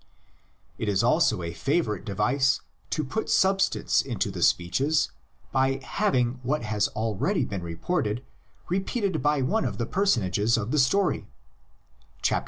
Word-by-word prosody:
It 110 - -1
is 95 -2 +2
also 90 - +3
a 85 0 -4
favorite 135 - -1
device 125 +6 +1 0.3
to 155 - -1
put 150 +11 -3
substance 195 0 +2
into - - -2
the - - -6
speeches 135 - +2 0.4
by 135 0 +1
having 130 - 0
what 135 +2 -1
has 105 -2 +1
already 110 -2 0
been 100 -2 -4
reported 105 - -2 0.4
repeated 195 +2 -1
by 150 -2 +2
one 215 +13 +1
of - - -3
the 115 - -1
personages 115 - +1
of 110 +1 -3
the 150 - +2
story 145 +10 +2 1.0
(xliii. - - +2
130 Hz, 140 wpm, -26 LUFS, 105-155 Hz, 1.0 s, also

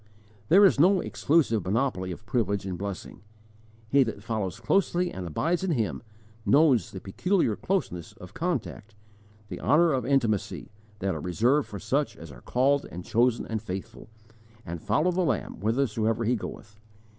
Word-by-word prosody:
There 195 +5 +7
is 185 - +4
no 185 +5 +5
exclusive 140 - +1
monopoly 95 -2 -1
of 105 +5 -9
privilege 100 -5 -1
and 95 -2 -3
blessing. 100 +1 -6 0.7
He 140 +5 +4
that 110 -5 -2
follows 110 -2 -3
closely 180 +6 +1
and 90 -2 -6
abides 165 - -1
in 190 - -1
Him 120 -10 -1 0.4
knows 140 -4 +4
the 95 - -8
peculiar 120 - 0
closeness 95 - -2
of - - -13
contact, 105 +1 -3 0.5
the - - -6
honour 165 +4 +4
of 130 - 0
intimacy, 120 -10 0 0.3
that 95 0 0
are 80 - -4
reserved 120 - +1
for 100 - -7
such 130 +9 -1
as 80 -2 -10
are - - -13
called 140 +3 +1
and 90 +1 -7
chosen 120 +1 +2
and 110 -1 -3
faithful, 95 0 -7 0.6
and 85 0 -6
follow 115 - +1
the 180 +1 0
Lamb 165 - -1
whithersoever 115 0 0
He 125 +3 +2
goeth. 105 -1 -8
115 Hz, 160 wpm, -27 LUFS, 100-145 Hz, 0.7 s, There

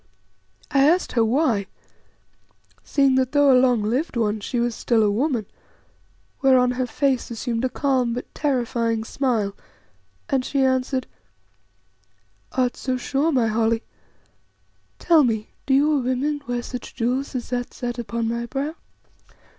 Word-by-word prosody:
I 275 +1 +4
asked 355 +3 +1
her 230 - +2
why, 225 -4 +1 1.2
seeing 275 -2 +2
that 260 +1 -3
though 285 -2 +5
a 250 - +6
long 245 -4 +3
lived 250 +6 -1
one, 215 -2 0
she 240 +4 -3
was 240 0 0
still 225 -1 +1
a 205 - +3
woman, 240 0 0 1.0
whereon 255 -2 +4
her 250 0 -2
face 270 -1 0
assumed 235 0 -3
a - - 0
calm 255 -4 0
but 250 - -7
terrifying 235 -5 0
smile, 225 -5 -1 0.7
and 265 -2 +1
she 275 +1 0
answered 260 0 0 1.5
"Art 255 -1 +1
so 255 -1 -2
sure, 280 +5 0
my 255 -5 +2
Holly? 225 +1 +1 1.1
Tell 330 -3 +4
me, 220 -4 -1 0.2
do 265 - +4
your 295 +1 +3
women 265 +4 -1
wear 245 -1 -2
such 250 0 -7
jewels 255 +3 -1
as 245 -1 -4
that 245 -1 -2
set 245 -1 -5
upon 235 0 -2
my 235 +1 -2
brow?" 280 +5 -3
250 Hz, 145 wpm, -23 LUFS, 230-270 Hz, 1.5 s, a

